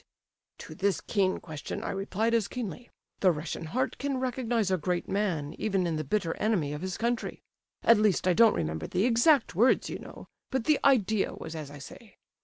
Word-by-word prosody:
_' - - -35 0.5
"To - - -9
this 195 +4 0
keen 190 -3 0
question 155 -3 -6
I - - -2
replied 205 +4 -1
as 225 -4 +2
keenly, 245 0 -6 0.3
'The 185 - +5
Russian 160 +1 -5
heart 255 +8 -2
can 280 -1 -1
recognize 240 -5 -1
a 185 - +3
great 175 +2 -2
man 180 -8 -1
even 195 -4 0
in 165 -2 -1
the 155 - -2
bitter 165 +2 -1
enemy 185 -10 0
of 150 - -6
his 185 -1 -4
country.' 235 0 -2 0.4
At 230 -2 +6
least, 210 -4 +2
I 180 - +5
don't 225 +4 +5
remember 80 0 -3
the 190 +4 0
exact 250 +3 +4
words, 235 +9 +3
you - - -5
know, - - -11 0.2
but 265 -3 -1
the 305 +3 +3
idea 220 -7 +3
was 160 0 -8
as 155 -3 -6
I 145 - -10
say. 205 +10 -12
200 Hz, 205 wpm, -29 LUFS, 165-230 Hz, 0.5 s, At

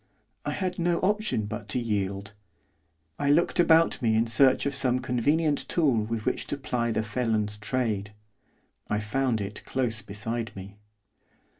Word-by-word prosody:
I - - -1
had 185 -2 -3
no 170 0 +2
option 210 - +1
but 105 0 -6
to 125 - 0
yield. 100 -2 -2 0.9
I 145 - +1
looked 170 +4 +3
about 165 -2 +4
me 110 -2 +2
in 115 +1 +3
search 130 +4 +4
of 140 - 0
some 130 -2 +2
convenient 145 +5 0
tool 150 -8 +2
with 110 -1 -4
which - - -1
to 145 - -2
ply 120 -3 -1
the 110 -1 0
felon's 110 -2 -1
trade. 105 -2 -1 0.8
I 105 - 0
found 115 +1 0
it 100 +1 -6
close 120 -4 -1
beside 110 +3 -3
me. 100 +2 -10
115 Hz, 155 wpm, -27 LUFS, 105-140 Hz, 0.9 s, about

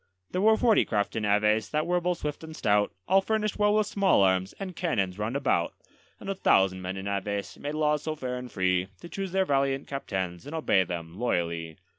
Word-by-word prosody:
There 185 - -1
were 220 +1 +5
forty 225 -3 +4
craft 105 -2 -1
in 110 -1 -1
Aves 105 +1 +2
that 155 +1 0
were 175 +1 +1
both 180 0 0
swift 150 +1 -5
and 160 0 -8
stout, 105 -4 +2 0.2
All 195 +2 +5
furnished 215 0 -1
well 210 0 +4
with 215 0 +3
small 195 - +3
arms 95 0 +2
and 190 -3 -5
cannons 100 - -1
round 110 +5 -2
about; 110 -11 0 0.4
And - - -10
a 195 - 0
thousand 95 - +3
men 95 +1 -4
in 95 +1 -5
Aves 100 0 -3
made 145 +1 -4
laws 150 -1 +1
so 155 0 -3
fair 130 -4 -4
and 125 -1 -7
free 95 -1 +1
To - - -8
choose 195 -1 -4
their 190 0 +2
valiant 135 -2 +1
captains 95 -8 -4
and 155 - -6
obey 125 -12 +3
them 85 +1 -6
loyally. 85 -8 -1
125 Hz, 215 wpm, -28 LUFS, -, 0.4 s, were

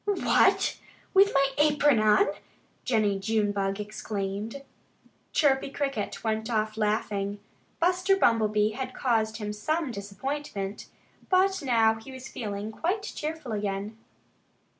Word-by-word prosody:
"What! 405 -2 +3 0.3
With 395 +1 +6
my 275 0 +3
apron 295 -4 +4
on?" 215 - +5 0.6
Jennie 210 -5 +1
Junebug 205 -1 0
exclaimed. 210 +3 -4 0.7
Chirpy 275 -3 +2
Cricket 275 -6 -3
went 220 0 -1
off 215 -2 0
laughing. 210 -2 -1 0.4
Buster 365 +3 +3
Bumblebee 215 - +3
had 255 +3 -5
caused 220 -4 +1
him 210 -2 -4
some 310 +7 -1
disappointment. 205 0 -5 0.4
But 385 +1 +3
now 225 -4 +3
he 245 +4 -11
was 260 0 -9
feeling 210 -1 -5
quite 370 - -1
cheerful 315 - -5
again. 205 0 -3
225 Hz, 115 wpm, -27 LUFS, 210-285 Hz, 0.7 s, With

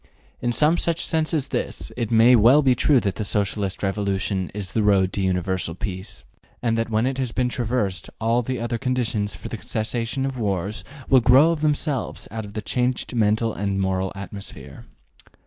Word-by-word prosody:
In 120 - 0
some 155 +7 +3
such 170 -1 +1
sense 160 -2 0
as 150 -5 -1
this, - - -3
it 115 -3 -2
may 115 +2 +6
well 120 +7 +6
be 130 -2 +5
true 135 +2 +3
that 100 -2 -2
the - - -2
Socialist 100 -1 -1
revolution 95 -1 -1
is 100 -3 -6
the 110 - +1
road 95 -3 +3
to 100 - -1
universal 90 -2 0
peace, 95 - -6 0.4
and 115 -2 0
that 115 0 -1
when 110 +1 +1
it 135 0 -1
has 130 -3 -1
been 125 +1 0
traversed 115 -6 -2
all 115 +2 +2
the 130 +2 -3
other 115 0 -2
conditions 115 -6 -1
for 95 - -8
the 115 - -6
cessation 115 +5 -2
of 135 -2 -4
wars 100 0 -2 0.2
will 130 -2 +5
grow 130 +7 +6
of 165 -3 -3
themselves 150 -2 -1
out 110 -1 -5
of 100 - -12
the 110 - -3
changed 125 +3 -1
mental 110 0 +1
and 100 -1 -2
moral 95 0 0
atmosphere. 100 0 -7
115 Hz, 190 wpm, -23 LUFS, 100-125 Hz, 0.4 s, may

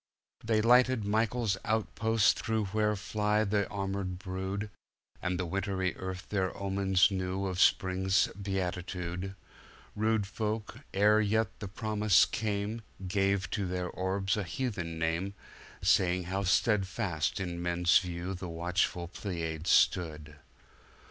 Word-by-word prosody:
They 110 -1 +2
lighted 125 -1 +4
Michael's 110 0 +1
outpost 110 0 +2
through 110 -2 0
Where 105 -1 +2
fly 105 +1 0
the 100 -1 0
armored 95 -2 -3
brood, 95 +2 -4 0.5
And 90 -1 -1
the 90 - -1
wintry 95 +1 -1
Earth 95 0 -6
their 95 -3 -1
omens 95 -1 +2
knew 95 0 -2
Of 95 -1 -1
Spring's 95 +1 +3
beatitude; 90 -1 -4 0.6
Rude 110 -1 +1
folk, 110 +3 -4
ere 105 +2 +4
yet 110 +2 0
the 105 - -5
promise 105 -1 +3
came, 105 +1 -2 0.3
Gave 95 0 +1
to 100 -3 -1
their 90 0 -2
orbs 95 +2 -1
a 105 - -1
heathen 90 -5 -3
name, 85 +5 -1 0.5
Saying 90 0 +3
how 95 +3 -2
steadfast 95 -4 +1
in 85 -2 -4
men's 85 0 +4
view 90 0 -4
The 90 -1 -6
watchful 85 +1 -1
Pleiads 85 -3 -4
stood. 75 -4 +2
95 Hz, 125 wpm, -31 LUFS, 90-105 Hz, 0.6 s, lighted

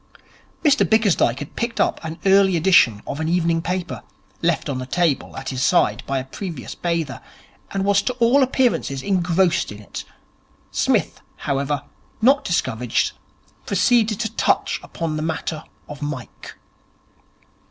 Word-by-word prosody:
Mr 290 -1 +5
Bickersdyke 205 - +3
had 145 +1 -8
picked 235 0 -3
up - - +1
an 160 0 -5
early 190 -2 +5
edition 155 - +4
of 140 - -5
an 160 0 -1
evening 165 -1 +1
paper, 180 +1 -3 0.4
left 170 -1 +1
on 135 -3 -2
the 130 - -6
table 165 -1 0
at 135 - -5
his 130 -1 -3
side 175 - +3
by 135 - 0
a 130 - -2
previous 160 0 -6
bather, 165 -7 -2 0.5
and 195 0 -2
was 200 0 +4
to 250 - -2
all 245 +3 +4
appearances 245 - +1
engrossed 180 - +1
in 105 - -8
it. 105 - -7 0.7
Psmith, - - 0
however, 140 0 -2 0.4
not 270 +5 +4
discouraged, 125 -8 0 0.6
proceeded 225 -4 +2
to 220 0 -3
touch - - +1
upon 160 -2 -4
the - - -2
matter 160 0 -3 0.2
of 150 0 -9
Mike. 145 -4 -6
170 Hz, 145 wpm, -22 LUFS, 140-200 Hz, 0.7 s, Mr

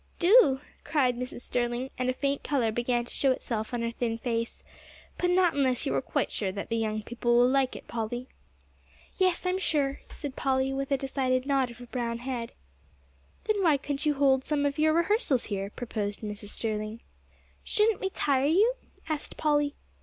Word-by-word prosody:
"Do," 350 - +6 0.2
cried 260 -5 +2
Mrs. 250 0 -5
Sterling, 245 +2 -2
and 255 0 -1
a - - +2
faint 280 +2 -1
color 250 -6 +1
began 240 +1 0
to - - -8
show 270 - +3
itself 225 -4 -3
on 240 -1 -2
her 230 - -1
thin 230 -1 -2
face, 230 -1 -3 0.6
"but 355 - +2
not 360 -1 +4
unless 260 -3 +1
you - - 0
are 135 - +1
quite - - -1
sure 195 -3 -1
that 200 +1 -6
the 230 - 0
young 215 -1 -1
people 240 +1 +1
will 245 +1 +6
like 265 0 +2
it, - - -10
Polly." 240 +2 -4 0.9
"Yes, 370 -1 +2
I 365 - +2
am 375 - -1
sure," 285 -6 0
said 285 -4 -6
Polly, 265 0 +1
with 275 0 -2
a 275 - +4
decided 260 -1 0
nod 270 -3 +2
of 235 - -11
her 245 - -10
brown 235 -1 -3
head. 245 -1 -4 0.9
"Then 425 -2 +1
why 320 -6 +4
couldn't 285 +2 -3
you 295 - +3
hold 270 -1 +3
some 290 0 0
of 280 +1 -1
your 310 0 +4
rehearsals 340 - +2
here?" 195 0 -2
proposed 210 -3 -4
Mrs. 210 -1 -6
Sterling. 215 +1 -3 0.6
"Shouldn't 430 0 +2
we 385 - 0
tire 280 -6 +1
you?" 405 +10 +4 0.3
asked 310 -2 -4
Polly. 295 -1 +1
260 Hz, 190 wpm, -28 LUFS, 235-290 Hz, 0.9 s, Do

